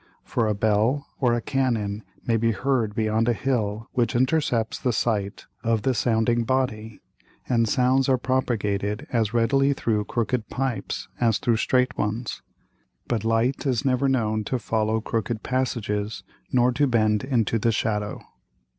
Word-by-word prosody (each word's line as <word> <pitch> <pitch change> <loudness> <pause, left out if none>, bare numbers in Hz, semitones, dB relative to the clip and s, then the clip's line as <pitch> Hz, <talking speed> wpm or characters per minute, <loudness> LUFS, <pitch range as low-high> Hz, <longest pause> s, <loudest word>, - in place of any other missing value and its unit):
For 115 -2 0
a 105 - 0
Bell 110 +7 +1
or 125 -3 +3
a 120 - -1
Cannon 115 -6 -1 0.2
may 115 - +2
be 115 0 +2
heard 115 -1 0
beyond 110 +1 +1
a - - +3
Hill 110 -3 -1
which 120 -3 0
intercepts 125 -3 +1
the 125 - 0
sight 105 -4 -1 0.2
of 115 -2 +1
the 130 - +2
sounding 115 0 +1
Body, 115 -4 -1 0.5
and 115 -3 +2
Sounds 130 +3 +2
are 130 - +4
propagated 110 -3 -1
as 115 -1 +1
readily 135 +4 +3
through 110 -5 -1
crooked 115 +1 -1
Pipes 130 -2 -3
as 115 -4 +3
through 115 -2 +1
streight 125 +2 +1
ones. 110 +3 -2 0.7
But 115 -3 -1
Light 115 +5 +1
is 130 0 0
never 135 +1 +2
known 110 -4 0
to 130 - -1
follow 110 -1 0
crooked 115 0 -2
Passages 110 -6 -2 0.3
nor 125 0 +4
to 145 +3 +2
bend 110 -3 +2
into 115 -4 +1
the 115 +2 +2
Shadow. 105 -1 -2
115 Hz, 155 wpm, -24 LUFS, 110-130 Hz, 0.7 s, are